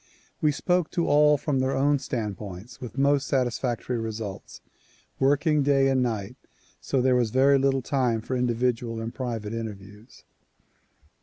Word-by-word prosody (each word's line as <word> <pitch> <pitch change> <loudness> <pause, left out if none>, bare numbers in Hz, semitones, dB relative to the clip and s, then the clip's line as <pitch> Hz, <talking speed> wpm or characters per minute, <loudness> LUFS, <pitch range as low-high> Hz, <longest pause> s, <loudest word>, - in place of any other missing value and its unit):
We 150 - +3
spoke 180 +3 0
to 170 - +2
all 150 0 +5
from 140 -1 -1
their 130 +1 0
own 140 +1 +2
standpoints 105 -2 -6
with 125 0 -8
most 140 0 +2
satisfactory 125 -2 -1
results; 110 -3 -6 0.6
working 145 +3 +3
day 135 -1 +3
and 130 -1 +2
night, 110 -5 -3 0.4
so 130 -3 -1
there 130 -1 +3
was 120 -2 +2
very 135 +4 +4
little 135 -1 +1
time 125 -5 0
for 130 +3 -4
individual 120 -1 -1
and 115 +1 -5
private 115 -4 -4
interviews. 105 -1 -8
125 Hz, 145 wpm, -26 LUFS, 115-140 Hz, 0.6 s, all